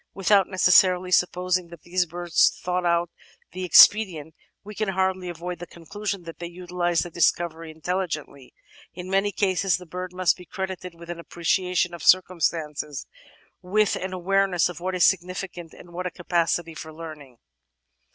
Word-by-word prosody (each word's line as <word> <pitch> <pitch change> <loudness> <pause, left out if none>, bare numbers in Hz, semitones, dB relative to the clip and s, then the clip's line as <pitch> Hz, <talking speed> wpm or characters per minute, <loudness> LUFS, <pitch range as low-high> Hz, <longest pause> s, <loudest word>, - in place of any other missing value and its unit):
Without 195 0 +3
necessarily 185 -1 +4
sup 180 0 +4
posing 180 0 -1
that 170 -2 -14
these 180 0 0
birds 175 0 +1
thought 180 0 -1
out 170 0 +1 0.4
the 185 +1 -6
expedient, 175 -3 +6 0.3
we 210 +1 -9
can 215 0 -2
hardly 190 -1 -1
avoid 175 0 -6
the 175 - -8
conclusion 195 +3 -6
that 165 -1 -10
they 170 - -5
utilise 175 -1 -1
the 175 - -8
discovery 165 -1 0
intelligently. 155 -5 -4 0.4
In 180 +1 -7
many 195 +1 +2
cases 195 -1 +1
the 180 - -12
bird 180 +2 -6
must 185 -1 +1
be 180 - -12
credited 185 -1 -6
with 170 +1 -9
an 170 - -7
appreciation 180 +1 0
of 170 - -8
circumstances, 160 -5 +1 0.6
with 205 +3 +1
an 190 0 -4
awareness 185 -1 +1
of 175 - -8
what 185 +1 -3
is 180 - +4
significant, 180 -2 -1
and 175 -1 -15
with 180 +1 -3
a - - -2
capacity 170 -1 -1
for 160 0 -9
learning. 155 -6 -10
180 Hz, 160 wpm, -24 LUFS, 170-185 Hz, 0.6 s, expedient